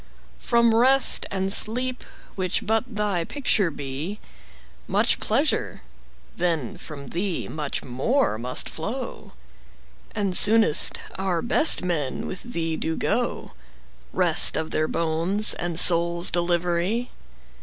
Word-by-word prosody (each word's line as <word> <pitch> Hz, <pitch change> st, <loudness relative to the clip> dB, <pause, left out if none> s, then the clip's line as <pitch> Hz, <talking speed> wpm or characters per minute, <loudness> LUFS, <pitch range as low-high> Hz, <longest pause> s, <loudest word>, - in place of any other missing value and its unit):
From 235 Hz, -1 st, +2 dB
Rest 260 Hz, +4 st, +5 dB
and 195 Hz, 0 st, -1 dB
Sleep, 250 Hz, +5 st, +1 dB, 0.3 s
which 185 Hz, -2 st, -2 dB
but 225 Hz, +2 st, 0 dB
thy 205 Hz, -5 st, -1 dB
picture 215 Hz, -5 st, -1 dB
be, 145 Hz, +5 st, -6 dB, 0.7 s
5 -, -, -24 dB
Much -, -, +1 dB
pleasure, -, -, -1 dB, 0.6 s
then 165 Hz, -8 st, -2 dB
from 140 Hz, -4 st, -11 dB
thee 180 Hz, 0 st, -4 dB
much 150 Hz, -2 st, -5 dB
more 135 Hz, -, -1 dB
must 125 Hz, +2 st, -1 dB
flow; -, -, -7 dB, 0.8 s
And 195 Hz, -3 st, -2 dB
soonest 220 Hz, -7 st, +4 dB, 0.2 s
our 185 Hz, -3 st, -2 dB
best 305 Hz, -, +5 dB
men 155 Hz, -7 st, -3 dB
with 185 Hz, -, -7 dB
thee 165 Hz, -9 st, -4 dB
do 160 Hz, 0 st, -3 dB
go— -, -, -2 dB, 0.6 s
Rest -, -, +4 dB
of 160 Hz, 0 st, -4 dB
their 155 Hz, 0 st, -1 dB
bones 170 Hz, +7 st, -1 dB
and 175 Hz, -1 st, -2 dB
souls' 170 Hz, 0 st, +4 dB
delivery! 175 Hz, +6 st, -1 dB
175 Hz, 120 wpm, -23 LUFS, 160-215 Hz, 0.8 s, Rest